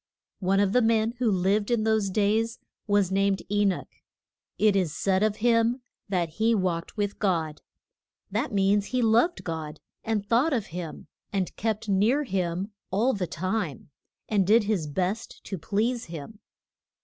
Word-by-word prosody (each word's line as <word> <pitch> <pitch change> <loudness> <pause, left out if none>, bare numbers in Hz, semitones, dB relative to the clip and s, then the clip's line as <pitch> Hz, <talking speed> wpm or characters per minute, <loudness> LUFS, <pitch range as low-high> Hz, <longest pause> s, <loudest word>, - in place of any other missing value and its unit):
One 195 +1 +2
of 200 -1 +2
the 250 - +5
men 225 -1 +2
who 245 -3 +2
lived 200 +2 +1
in 235 -3 +2
those 220 -2 +2
days 215 +4 +1 0.3
was 205 -3 +2
named 195 0 +1
E 205 0 +3
noch. 195 -2 0 0.7
It 210 -2 +4
is 180 -6 0
said 190 -1 +1
of 215 -1 +2
him 235 +2 +2 0.3
that 175 -4 0
he 220 +8 +1
walked 180 -1 -2
with 205 -1 -2
God. 165 -6 0 0.7
That - - -1
means 200 0 +2
that - - -10
he 250 - +2
loved 235 +11 +3
God, 160 -2 -5 0.2
and 220 -3 -1
thought 250 +9 +2
of 225 -6 0
him, 170 -3 -6 0.3
and 190 -3 -2
kept 220 0 -2
near 215 +9 +3
him 190 -3 -2 0.2
all 225 +7 +2
the 185 -3 -2
time, 180 - -3 0.4
and 200 -4 +1
did 220 +2 +5
his 200 -7 -1
best 185 +8 -3
to 195 - -5
please 220 +8 -1
him. 170 +6 -9
205 Hz, 165 wpm, -27 LUFS, 185-225 Hz, 0.7 s, the